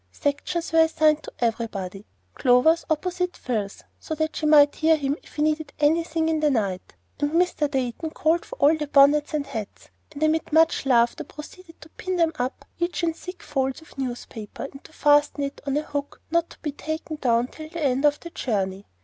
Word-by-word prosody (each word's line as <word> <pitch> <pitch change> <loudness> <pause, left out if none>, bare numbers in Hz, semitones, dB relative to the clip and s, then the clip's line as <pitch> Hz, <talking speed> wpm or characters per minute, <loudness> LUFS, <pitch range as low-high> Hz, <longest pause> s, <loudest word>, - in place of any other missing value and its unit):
Sections 320 - -2
were 325 - +5
assigned 310 -1 +4
to - - -9
everybody, 215 -4 -3 0.3
Clover's 260 +7 +4
opposite 360 +3 -1
Phil's 215 -5 -3 0.2
so 315 - -5
that 315 0 -2
she 310 - -1
might 290 -1 +7
hear 320 0 +4
him 280 -1 -1
if - - -18
he 300 - 0
needed 310 0 -1
anything 320 +1 +2
in 320 -1 +1
the 305 -1 +3
night; 200 -8 -2 0.2
and 290 +1 0
Mr. 335 -4 +2
Dayton 265 +3 -2
called 320 +2 +1
for - - -9
all 295 +3 +4
the 300 -1 -4
bonnets 290 +2 +4
and 290 -2 -1
hats, 220 -7 -7 0.2
and 295 +1 -4
amid 315 +1 +1
much 320 -3 +3
laughter 240 +4 +3
proceeded 330 +4 -12
to 310 - -13
pin 350 -1 0
up 250 +2 -3
each 345 0 -1
in 330 -1 +1
thick 360 +2 -10
folds 265 +2 -2
of - - -18
newspaper, 240 -5 -6
and 275 0 -9
fasten 290 -1 +3
it 275 0 -5
on 280 +1 +1
a 300 - 0
hook 285 -1 -5
not 335 0 +1
to - - -15
be 300 - -1
taken 315 +2 -5
down 240 -4 +2
till 310 +4 -10
the 335 -1 -5
end 265 0 +1
of 295 0 +3
the 340 - -9
journey. 195 - -2
300 Hz, 195 wpm, -24 LUFS, 265-320 Hz, 0.3 s, might